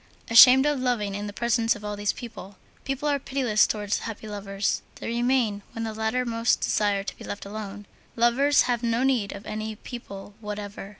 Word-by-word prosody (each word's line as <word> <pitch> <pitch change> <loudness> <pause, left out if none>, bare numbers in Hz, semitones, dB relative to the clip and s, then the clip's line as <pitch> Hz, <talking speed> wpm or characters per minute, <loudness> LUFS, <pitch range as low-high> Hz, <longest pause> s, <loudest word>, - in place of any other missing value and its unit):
Ashamed 255 +4 +9
of 295 -2 +1
loving 240 -6 -1
in 205 +1 -4
the - - -5
presence 230 +1 +1
of 210 0 -10
all 210 0 -3
these 205 0 0
people. 205 -5 -10 0.3
People 275 +2 -2
are 285 -1 +1
pitiless 255 -6 +2
towards 210 -1 -1
happy 220 -1 -7
lovers; 200 -1 -2
they - - -7
remain 235 -3 +1
when 225 - -4
the 220 -1 -3
latter 220 +3 -1
most 230 0 +1
desire 205 -2 +1
to - - -6
be - - -9
left 205 - -6
alone. 205 0 -7 0.3
Lovers 250 +5 +4
have 240 -2 0
no 235 +1 0
need 250 -7 +1
of 200 - -9
any 215 0 -4
people 205 -4 -9
whatever. 205 -1 -6
220 Hz, 190 wpm, -26 LUFS, 205-245 Hz, 0.3 s, Ashamed